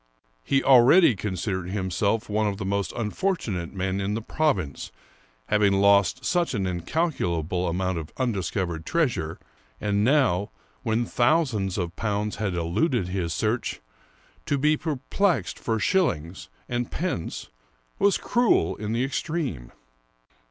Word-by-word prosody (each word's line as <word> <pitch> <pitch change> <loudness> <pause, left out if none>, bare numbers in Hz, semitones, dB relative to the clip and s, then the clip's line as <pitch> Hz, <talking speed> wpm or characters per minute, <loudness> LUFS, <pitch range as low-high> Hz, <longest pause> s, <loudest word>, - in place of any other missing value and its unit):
He 135 -1 +1
already 130 - +6
considered 95 -1 -3
himself 100 +3 -1
one 105 0 0
of 100 -1 -2
the 95 - -5
most 100 0 -1
unfortunate 110 - -2
men 95 0 -2
in 100 +2 -1
the 115 - -3
province, 100 - -1 0.5
having 105 - +3
lost 100 +5 +3
such 170 -7 +1
an 100 -3 -1
incalculable 90 - -1
amount 90 0 -1
of 80 0 -8
undiscovered 95 -8 -2
treasure, 120 - -1 0.4
and 100 0 0
now, 115 -7 +2 0.3
when 115 -1 0
thousands 120 - +1
of 90 -2 -3
pounds 105 -1 -2
had 100 -4 -2
eluded 90 - 0
his 90 -3 -2
search, 110 +7 -1 0.7
to 140 - +1
be 150 +3 +3
perplexed 160 +6 -1
for 115 -1 -1
shillings 95 - 0 0.2
and 120 0 -2
pence 170 - -4 0.5
was 200 0 +4
cruel 240 - +2
in 105 +1 -3
the 120 +2 +1
extreme. 135 - -3
105 Hz, 130 wpm, -25 LUFS, 95-135 Hz, 0.7 s, already